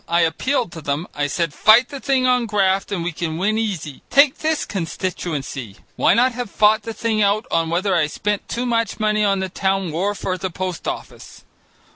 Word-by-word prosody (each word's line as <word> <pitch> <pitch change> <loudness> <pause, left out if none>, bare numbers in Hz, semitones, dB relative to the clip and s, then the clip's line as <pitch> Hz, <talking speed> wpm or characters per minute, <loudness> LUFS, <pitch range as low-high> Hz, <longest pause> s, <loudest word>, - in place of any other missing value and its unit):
I 170 +1 +2
appealed 180 - 0
to 165 - -8
them. 145 +3 -2
I 145 0 -1
said, 165 +1 -1
fight 225 +9 +5
the 280 - -7
thing 265 -2 +1
on 250 -2 +2
graft 195 -1 +1
and 180 -4 -2
we 175 - -2
can 160 -1 -4
win 215 +5 +1
easy. 180 -10 -4
Take 280 -1 +5
this 315 -1 0
constituency, 160 - -4 0.2
why - - +3
not 250 +2 +4
have 245 -2 -5
fought 215 +2 +3
the 225 +1 -6
thing 220 -2 0
out 205 +3 +2
on 165 -1 +1
whether 185 +4 0
I 155 -3 +2
spent 205 +6 -3
too 245 +1 -2
much 230 -3 -1
money 215 0 +1
on 195 -2 +2
the 190 - -1
town 190 -1 -1
wharf 195 +6 -2
or 185 -1 -1
the 190 - -2
post 185 0 -5
office? - - -7
195 Hz, 205 wpm, -21 LUFS, 170-225 Hz, 0.2 s, fight